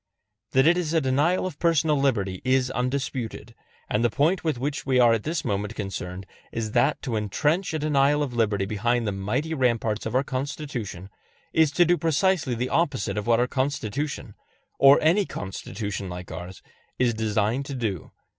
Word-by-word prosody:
That 130 +1 +5
it 175 +2 +5
is 165 -2 -2
a - - +5
denial 150 +7 +1
of 180 -6 -6
personal 160 -2 +3
liberty 105 -10 0
is 130 0 +2
undisputed; 125 -3 -3 0.3
and 105 - 0
the 120 - +4
point 155 - +1
with 155 -5 0
which 140 +3 -3
we 130 -2 +2
are 120 -2 +6
at 115 - 0
this 160 +6 -3
moment 105 +2 -2
concerned 95 -2 -5 0.3
is 110 -2 -3
that - - +2
to 120 - -2
entrench 150 - 0
a 160 - -1
denial 145 -1 +2
of 135 -4 -4
liberty 105 -4 +1
behind 115 +4 0
the 105 - 0
mighty 115 +12 -2
ramparts 115 -6 0
of 110 - -4
our 130 - +3
Constitution 130 - -5 0.4
is 160 -3 +4
to 175 - +5
do 175 +1 +2
precisely 165 -4 +1
the 125 +2 -2
opposite 145 -10 0
of 105 +2 -3
what 115 -1 +4
our 120 - +3
Constitution 140 +1 -3 0.5
or 140 +1 +8
any 180 +5 +3
Constitution 95 0 -5
like 90 0 -7
ours 90 +3 -8 0.3
is 125 -2 +2
designed 110 +4 0
to 140 - -5
do. 110 -8 -3
125 Hz, 180 wpm, -25 LUFS, 105-150 Hz, 0.5 s, or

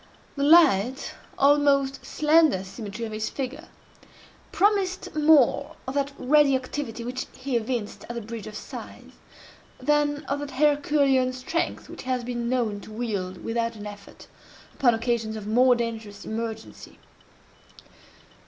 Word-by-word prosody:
The 280 - -4
light, 275 - +4 0.2
almost 275 -1 +3
slender 305 - +3
symmetry 210 +3 -6
of 220 - -6
his 215 0 -3
figure, 265 -1 -5 0.8
promised 390 -3 +1
more 300 -1 +4
of 265 - -3
that 280 0 0
ready 285 +1 +4
activity 255 -3 -4
which 250 +2 -4
he 260 -1 -3
evinced 230 -2 -3
at 240 - -5
the 235 - -3
Bridge 225 -1 -7
of 215 - -9
Sighs, - - -9 0.7
than 295 0 +1
of 280 - -2
that 290 0 -5
Herculean 280 -2 +2
strength 255 +7 -3
which - - -9
he 260 - -8
has 250 -1 0
been 240 -1 -3
known 235 -5 0
to 215 - -12
wield 205 -5 -4
without 230 0 -1
an 210 -1 -9
effort, 205 -1 -11 0.5
upon 240 -4 +3
occasions 225 -1 -1
of 215 -2 -6
more 245 +4 +4
dangerous 225 -3 -5
emergency. 220 0 -6
255 Hz, 140 wpm, -25 LUFS, 225-285 Hz, 0.8 s, light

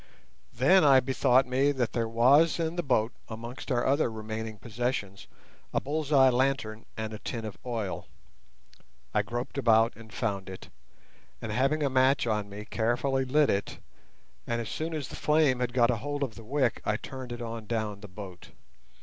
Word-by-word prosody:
Then 155 +10 +4
I 135 -3 +7
bethought 130 0 +3
me 130 +3 +2
that 125 -4 -1
there 115 -1 0
was 135 +9 +4
in 165 0 -1
the 175 - 0
boat, 125 -6 +1 0.2
amongst 120 +5 -7
our 120 -1 +1
other 140 -2 +2
remaining 110 0 -5
possessions, 110 -2 -3 0.5
a - - +4
bull's 150 +1 -3
eye 135 -3 +6
lantern 125 -4 -1
and 110 0 -4
a 105 - -7
tin 115 -2 -5
of 110 - -7
oil. 115 -6 -4 1.1
I - - +3
groped 120 +3 -4
about 115 -2 +4
and 110 -1 -13
found 100 -4 -3
it, 95 - -9 0.7
and 110 - -5
having 135 +7 +1
a 140 - +2
match 130 +1 +3
on 105 -3 -1
me 105 +1 -8
carefully 125 +5 0
lit 145 +3 +3
it, 100 - -2 0.7
and 120 - -1
as 115 -2 -4
soon 160 +5 -3
as 145 -4 -4
the - - -8
flame 150 -4 +2
had 125 -1 -1
got 120 -1 +3
a 120 - -1
hold 145 +4 -3
of 125 -5 -3
the 115 - -11
wick 130 +1 0
I 105 - 0
turned 130 0 -8
it 120 - -5
on 115 -2 -6
down 110 -3 -2
the 105 - -9
boat. 95 -2 -10
120 Hz, 185 wpm, -28 LUFS, 110-135 Hz, 1.1 s, I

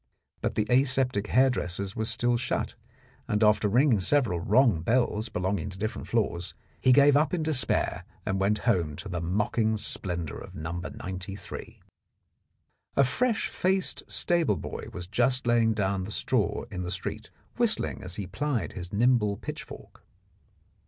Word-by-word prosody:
But - - -1
the 105 - +1
aseptic 125 -4 +2
hairdresser's 100 -7 +1
was 110 0 -1
still 120 0 +2
shut, 120 +1 -2 0.5
and 105 0 +1
after 105 0 +4
ringing 120 0 +4
several 110 -3 +2
wrong 105 - +3
bells 115 +1 +1
belonging 95 +1 -2
to 95 - -8
different 110 +3 -4
floors, 95 -6 -1 0.3
he 130 - +5
gave 140 +2 +6
up 155 +5 +3
in 165 - -2
despair 145 -7 +1 0.2
and 95 0 -1
went 100 +2 +2
home 85 -10 +1
to 100 - -8
the 90 -3 -3
mocking 110 +5 0
splendour 85 -6 -3
of - - -11
No. 80 +2 -5
93. 95 +2 -7 1.1
A 140 - +5
fresh 225 - +1
faced 190 +1 0
stable 170 -3 +2
boy - - -6
was 90 - -6
just 125 +6 +1
laying 120 -1 +3
down 100 -2 0
the - - -7
straw - - 0
in 90 - -4
the 90 - -4
street, - - -5 0.3
whistling - - 0
as 90 0 -6
he 100 - -4
plied 125 +6 -2
his 90 -1 -6
nimble 105 -2 +2
pitchfork. - - -9
105 Hz, 150 wpm, -28 LUFS, 95-125 Hz, 1.1 s, gave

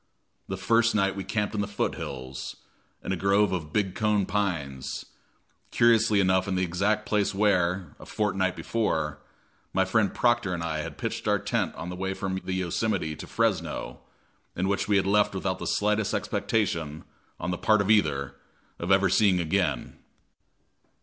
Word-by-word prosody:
The - - -4
first 115 0 +3
night 100 -1 +2
we 100 - -4
camped 105 +2 -2
in 105 - 0
the 105 - -2
foot 100 - -1
hills, 65 0 -6 0.5
in - - -3
a - - +1
grove 100 +2 +3
of 80 -5 -3
big 95 -2 0
cone 105 -2 +1
pines, 85 -10 -2 0.6
curiously 115 -2 +4
enough 95 0 +3
in 95 - -1
the 95 - +1
exact 100 +5 0
place 105 -1 0
where, 90 -4 +1
a - - -12
fortnight 95 -3 0
before, 80 -10 -1 0.5
my 95 0 +3
friend 100 +2 +2
Proctor 120 -6 +1
and 85 - -4
I 80 -2 -2
had 75 - -6
pitched - - -4
our - - +4
tent - - -1
on 85 - -6
the 90 - -5
way 95 +1 -3
from 95 -1 -3
the 95 - -3
Yosemite 90 -2 -1
to - - -9
Fresno, - - -1 0.6
and 90 +2 0
which 100 0 0
we 105 -1 +3
had 95 - +2
left 100 0 +3
without 95 0 -2
the - - -4
slightest 105 0 +1
expectation, 80 -9 -1 0.4
on 90 - -2
the 90 - -2
part 110 -1 +4
of 100 +1 +2
either, 75 - +2 0.5
of 85 +3 -2
ever 95 0 +5
seeing 95 -1 +4
again. 80 -6 -1
95 Hz, 175 wpm, -27 LUFS, 90-105 Hz, 0.6 s, ever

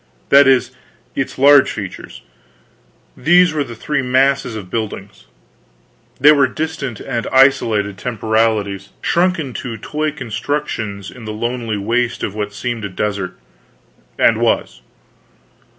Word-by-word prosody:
That 140 0 +7
is, 130 -2 +3 0.4
its 135 - -3
large 140 0 +6
features. 100 -4 -8 0.9
These 175 +3 +4
were 150 -2 0
the 120 -4 -9
three 150 +5 -2
masses 130 -1 +1
of 95 -4 -8
buildings. 100 -3 -5 0.9
They 145 +3 +7
were 140 -3 +4
distant 145 - -4
and 115 - -4
isolated 110 -7 +3
temporalities 110 -4 -1
shrunken 170 -6 +1
to 115 -1 -5
toy 150 +8 -2
constructions 115 -6 -4
in 120 -3 -12
the 110 - -4
lonely 120 0 -3
waste 120 +4 -1
of 100 - -2
what 105 -1 -4
seemed 120 +1 -4
a 100 - -3
desert 95 -1 -3 0.8
and - - +3
was. - - 0
120 Hz, 125 wpm, -18 LUFS, 105-140 Hz, 0.9 s, That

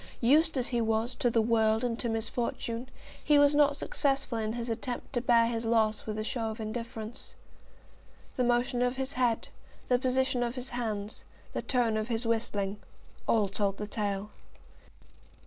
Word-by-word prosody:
Used 300 +5 +4
as 250 - 0
he 240 -2 +1
was 225 +2 0
to 245 - +1
the 230 -1 +2
world 220 0 +2
and 240 -2 -1
to 235 - -1
misfortune, 230 +2 -2 0.3
he 295 - +5
was 285 0 +6
not 290 -1 +4
successful 275 -5 0
in 215 0 -1
his 235 0 -4
attempt 240 +3 -4
to 245 - +1
bear 235 -1 +5
his 230 0 -1
loss 225 -2 +1
with 215 0 -3
a 215 - -1
show 225 0 -2
of 220 +1 -6
indifference. 225 +1 -6 1.0
The 250 - +1
motion 245 0 +2
of 245 +1 +1
his 265 +1 -3
head, 245 -3 +1 0.4
the 250 -1 +4
position 260 0 +1
of 240 +1 -1
his 255 0 -5
hands, 215 -3 -4 0.3
the - - -2
tone 240 -4 +1
of 215 0 -2
his 230 0 -1
whistling, 210 -3 -1 0.5
all 215 -3 +3
told 195 0 -1
the 210 - -3
tale. 205 -1 -3
235 Hz, 175 wpm, -30 LUFS, 220-250 Hz, 1.0 s, was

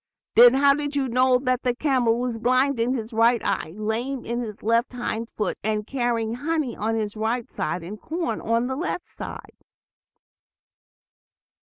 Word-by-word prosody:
"Then 240 +2 +8
how 280 +1 +5
did 290 0 -3
you 275 -2 +1
know 255 +1 +3
that 255 0 0
the 245 -2 0
camel 250 -5 +2
was 245 -2 -2
blind 255 +3 +2
in 245 +3 +1
his 225 -1 -5
right 230 +2 +4
eye, 160 +3 -2
lame 235 +5 -2
in 240 +1 -2
his 215 -3 -7
left 230 +4 +1
hind 230 -2 -3
foot, 210 - -3
and 210 0 -1
carrying 235 -3 -1
honey 290 0 -2
on 225 +2 -1
the 210 -2 -2
right 225 +2 -1
side, 175 - -3
and 200 +5 -8
corn 335 +1 -3
on 230 +2 +1
the 260 +1 -2
left 345 +3 -3
side?" - - -9
240 Hz, 170 wpm, -24 LUFS, 225-260 Hz, -, Then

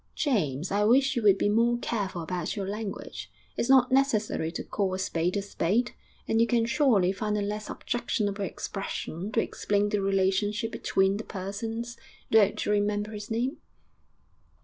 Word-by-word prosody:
'James, 175 - 0
I 205 +1 +2
wish 260 +5 +4
you 240 - 0
would 200 -3 +5
be - - +1
more 230 +3 +3
careful 200 -7 -3
about 175 0 -3
your 195 -2 -3
language. 195 - -6 0.2
It's 235 - -1
not 260 -1 +6
necessary 220 - +1
to - - -4
call 195 -3 -1
a - - -3
spade 180 0 -1
a 200 - -1
spade, 205 +4 0 0.4
and 225 0 +2
you 230 - +4
can 235 -2 +2
surely 235 -7 +3
find 210 +2 -2
a - - 0
less 210 +1 -4
objectionable 210 -4 -2
expression 195 -1 -5
to - - +3
explain 205 0 0
the 205 -1 0
relationship 195 +3 +1
between 195 +1 +1
the 220 - -5
persons.... 225 +5 -5 0.3
Don't 210 -2 +4
you - - +1
remember 205 0 0
his 210 -1 -7
name?' 240 +5 -1
205 Hz, 170 wpm, -28 LUFS, 195-230 Hz, 0.4 s, not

